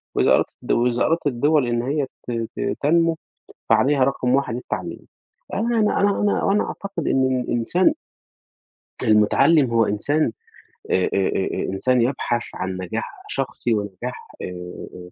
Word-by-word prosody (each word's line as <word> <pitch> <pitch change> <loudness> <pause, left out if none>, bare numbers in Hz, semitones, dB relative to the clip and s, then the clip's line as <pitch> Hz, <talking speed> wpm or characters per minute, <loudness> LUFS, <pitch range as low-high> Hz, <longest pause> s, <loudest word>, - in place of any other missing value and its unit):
وإذا - - +3
أرادت - - +2
الدوز 120 0 +1
وإذا - - +3
أرادت 165 -2 +1
الدِوَل 145 +1 +2
إن 120 0 0
هي 140 +1 0 0.2
ت - - -3 0.3
ت - - -1
تنمو، 165 +2 +3 0.5
فعليها 140 -1 +4
رقم 130 -1 +1
1 135 -4 0
التعليم. 125 - -5 0.5
أنا 230 +2 +1
أنا 210 - +2
أنا 200 0 +2
أنا 205 - +1
وأنا 200 +1 +2
أعتقد 200 -5 -5
إن 130 -1 +2
الإنسان 145 - +1 1.1
المُتعلّم 120 +6 +4
هو 115 -1 +3
إنسان 115 +6 0 0.6
آآ 95 - +2
آآ 95 0 0
إنسان 125 +5 +2
يبحث 120 -1 0
عن 95 0 -3
نجاح 95 +5 -5
شخصي 125 -3 -2
ونجاح 105 +4 -4
آآ 90 0 -8
125 Hz, 140 wpm, -22 LUFS, 115-155 Hz, 1.1 s, فعليها